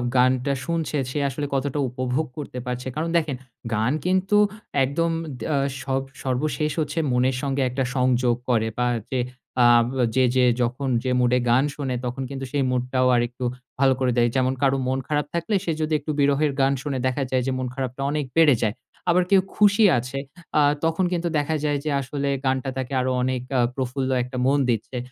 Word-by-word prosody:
গানটা 130 +2 +3
শুনছে, 165 -3 -1
সে 150 - -2
আসলে 145 +2 -4
কতটা 140 +1 -1
উপভোগ 130 +4 -1
করতে 140 -4 -6
পারছে? 125 +1 -4
কারণ 160 +2 -1
দেখেন, 155 -4 0 0.4
গান 110 +3 +1
কিন্তু 190 +3 +2 0.5
একদম 165 +5 0 0.3
দা 150 - -1 0.3
সব 135 0 0 0.2
সর্বশেষ 150 +4 -1
হচ্ছে 155 +1 -1
মনের 125 +1 +2
সঙ্গে 140 -1 -1
একটা 135 +2 -1
সংযোগ 125 -2 +2
করে 110 -2 +2
বা, 125 0 +1 0.2
যে 130 - 0 0.4
আ - - +6 0.5
যে 130 - +4
যে 130 -1 +5 0.2
যখন 125 +3 -1 0.2
যে 130 - 0
মুডে 125 0 +3
গান 125 +3 +4
শোনে, 135 -3 -2
তখন 125 +2 -3
কিন্তু 135 -1 -5
সেই 140 0 +1
মুডটাও 125 +1 +1
আরেকটু 120 +1 -1 0.4
ভালো 135 -1 +5
করে 130 -1 +2
দেয়। 120 0 +4
যেমন 130 0 +2
কারোর 135 -1 +2
মন 130 +1 0
খারাপ 150 -1 0
থাকলে, 170 +5 -1
সে 165 - 0
যদি 155 0 0
একটু 150 +2 -4
বিরহের 145 +1 +3
গান 135 +1 +3
শুনে, 140 -1 -3
দেখা 130 +2 -1
যায় 130 -1 +2
যে - - +1
মন 130 0 -2
খারাপটা 130 0 -4
অনেক 150 -1 -1
বেড়ে 155 -5 +6
যায়। 110 0 0 0.3
আবার 180 +1 +4
কেউ 195 -1 +6
খুশি 205 +1 +4
আছে 125 +3 -3 0.4
আ - - +6 0.2
তখন 165 +3 +1
কিন্তু 175 -1 -1
দেখা 150 +2 0
যায় 145 -1 +1
যে - - 0
আসলে 140 +1 -3 0.2
গানটা 130 0 0
তাকে 130 +1 -4
আরও 130 0 0
অনেক 130 -1 -1 0.2
আ - - +3 0.2
প্রফুল্ল 130 0 -2
একটা 125 +1 -7
মন 140 +1 +3
দিচ্ছে। 120 +2 -1
135 Hz, 190 wpm, -24 LUFS, 125-150 Hz, 0.5 s, আ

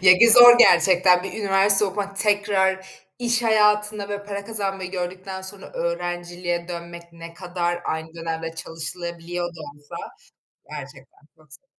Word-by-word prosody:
Ye 185 -1 +6
bir 235 - +7
zor 240 +1 +9
gerçekten, 185 -5 +5
bir 190 0 -7
üniversite 200 0 +3
okumak 200 0 -4
tekrar 195 -2 +1 0.3
iş 240 -1 0
hayatında, 210 -2 +1
böyle, 205 0 -6
para 200 0 -6
kazanmayı 195 -4 -4
gördükten 185 +1 -6
sonra 190 +1 -11
öğrenciliğe 175 0 -4
dönmek, 170 0 -8
ne 165 0 -11
kadar 175 -1 -4
aynı 160 +1 -5
dönemde 165 0 -5
çalışılabiliyor 170 +2 -6
da 170 -1 -13
olsa, 145 0 -12 0.7
gerçekten - - -11 0.2
çok 155 -3 -20
zor. 270 - -15
185 Hz, 135 wpm, -22 LUFS, 170-200 Hz, 0.7 s, zor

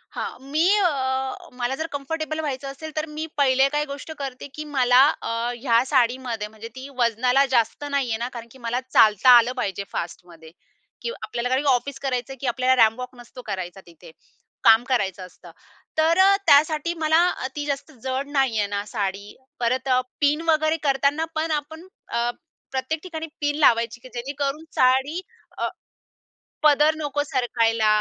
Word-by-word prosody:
हां. - - -5
मी 320 +3 +3
अ, 265 -6 -1
मला 245 +2 -1
जर 320 +3 -3
कम्फर्टेबल 310 +2 -3
व्हायचं 275 -2 -4
असेल, 315 +3 -8
तर 310 - -1
मी 315 - -2
पहिले 270 -1 +4
काही 295 0 +1
गोष्ट 285 +3 -7
करते 270 -1 -6
की 305 - -5
मला 250 0 +5 0.2
अ, - - -4 0.3
ह्या 240 -1 +2
साडीमध्ये 245 -4 0
म्हणजे 220 +1 -10
ती 260 +1 -8
वजनाला 250 +3 +3
जास्त 230 +3 +1
नाहीये 255 -6 0
ना, 240 +2 -3
कारण 235 -1 -8
की 265 - -15
मला 245 +2 0
चालता 215 +3 +5
आलं 235 +1 +3
पाहिजे 200 -2 -3
फास्टमध्ये. 165 -1 -7 0.5
की 470 - -3
आपल्याला 245 - -3
काही 260 +3 +1
ऑफिस 270 +2 +1
करायचं 255 -2 -2
आहे 265 - -13
की 275 - -2
आपल्याला 255 +1 +2
रॅम्प 225 +2 +4
वॉक 250 0 -7
नसतो 245 +1 -12
करायचा 190 -2 -5
तिथे. 170 0 -15 0.5
काम 225 +1 +7
करायचं 195 -7 0
असतं. 180 - -15 0.5
तर 320 +2 +3
अ, 395 +1 +6
त्यासाठी 305 +3 +4
मला 315 +1 +4 0.4
ती 290 -1 -3
जास्त 280 +2 -4
जड 265 +1 -2
नाहीये 245 -7 +1
ना 200 +1 -2
साडी. 200 -1 -4 0.2
परत 255 +3 0
अ, 255 0 +4 0.2
पिन 295 +2 +3
वगैरे 310 0 +3
करताना 280 +2 +1
पण 315 +1 -1
आपण 315 +4 -4 0.2
अ, 235 +1 0 0.4
प्रत्येक 270 +4 -2
ठिकाणी 325 -3 -6
पिन 290 0 0
लावायची 235 -4 +3
की 255 - -12
जेणेकरून 280 +4 -3
साडी 265 +7 +2 0.4
अ, - - -1 0.9
पदर 300 +1 +5
नको 290 -2 -2
सरकायला 230 -5 +1
260 Hz, 165 wpm, -23 LUFS, 235-295 Hz, 0.9 s, काम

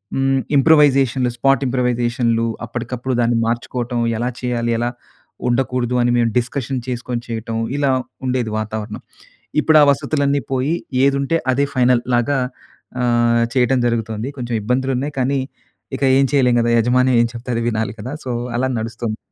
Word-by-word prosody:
హ్మ్, 135 0 +2 0.2
ఇంప్రూవైజేషన్లు 135 -4 +4
స్పాట్ 135 +2 +3
ఇంప్రూవైజేషన్లు 120 -2 0 0.2
అప్పటికప్పుడు 125 +2 -4
దాన్ని 120 0 +2
మార్చుకోవటం. 120 +1 -2 0.2
ఎలా 120 +2 -1
చేయాలి? 120 -2 -1
ఎలా 120 +1 0 0.6
ఉండకూడదు? 125 0 0
అని 120 0 +2
మేము 115 -1 +2
డిస్కషన్ 130 +1 -3
చేసుకొని 120 -1 -3
చేయటం, 115 0 -4 0.2
ఇలా 140 -2 +2 0.3
ఉండేది 125 -3 -1
వాతావరణం. 110 0 -5 0.6
ఇప్పుడు 155 -1 +5
ఆ - - +8
వసతులన్నీ 140 +1 0
పోయి 135 +5 +1 0.3
ఏదుంటే 140 +3 +1 0.2
అదే 140 +2 +1
ఫైనల్ 125 -1 +3
లాగా 135 +3 +1 0.6
ఆహ్, 120 -1 +3
చేయటం 130 0 +3
జరుగుతోంది. 115 0 -2
కొంచెం 120 -1 -3
ఇబ్బందులు 130 +4 0
ఉన్నాయి, 145 +3 -3
కానీ 135 +2 +1 0.6
ఇక - - -10 0.2
ఏం 135 - +4
చేయలేం 125 -4 +3
గదా! 120 0 +1
యజమాని 125 +3 +3
ఏం 120 - +4
చెప్తే 120 +2 -7
అది 115 - -1
వినాలి 110 -2 -1
కదా! 125 +6 -6
సో 125 - -4 0.3
అలా 130 +2 +1
నడుస్తోంది. 110 0 -4
125 Hz, 145 wpm, -19 LUFS, 115-135 Hz, 0.6 s, ఆ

